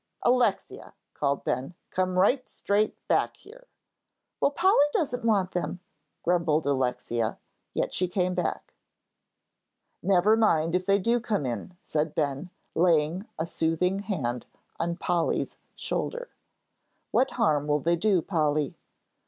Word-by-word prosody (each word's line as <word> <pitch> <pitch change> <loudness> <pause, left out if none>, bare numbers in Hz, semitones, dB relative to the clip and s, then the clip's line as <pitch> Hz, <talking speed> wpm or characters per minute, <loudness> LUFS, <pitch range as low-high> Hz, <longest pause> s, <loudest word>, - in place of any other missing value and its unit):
"Alexia," 245 0 +1 0.2
called 140 -1 -1
Ben, 130 +7 -2 0.2
"come 185 0 0
right 250 +8 +3
straight 205 +2 0
back - - +1
here." - - -16 0.7
"Well, - - +3
Polly 295 -1 +4
doesn't 250 -7 -1
want 200 -5 +2
them," 180 0 -3 0.4
grumbled 165 -3 +2
Alexia, 125 -4 -1 0.4
yet - - -1
she 185 - +1
came 180 0 0
back. 180 -1 -3 1.3
"Never 195 +3 +4
mind 165 -7 +2
if 180 +1 0
they 200 0 +5
do 230 +5 +2
come 215 - -1
in," 130 +9 -5
said 155 0 -1
Ben, 145 +3 -1 0.2
laying 170 +2 +2
a 160 - -1
soothing 170 +3 0
hand 145 - -3 0.3
on 170 +1 -1
Polly's 175 -1 -1 0.2
shoulder. - - -3 0.8
"What 265 - +3
harm 150 - +2
will 150 0 +3
they 170 +4 +2
do, 185 -1 +2
Polly?" 150 -4 0
180 Hz, 130 wpm, -27 LUFS, 155-210 Hz, 1.3 s, they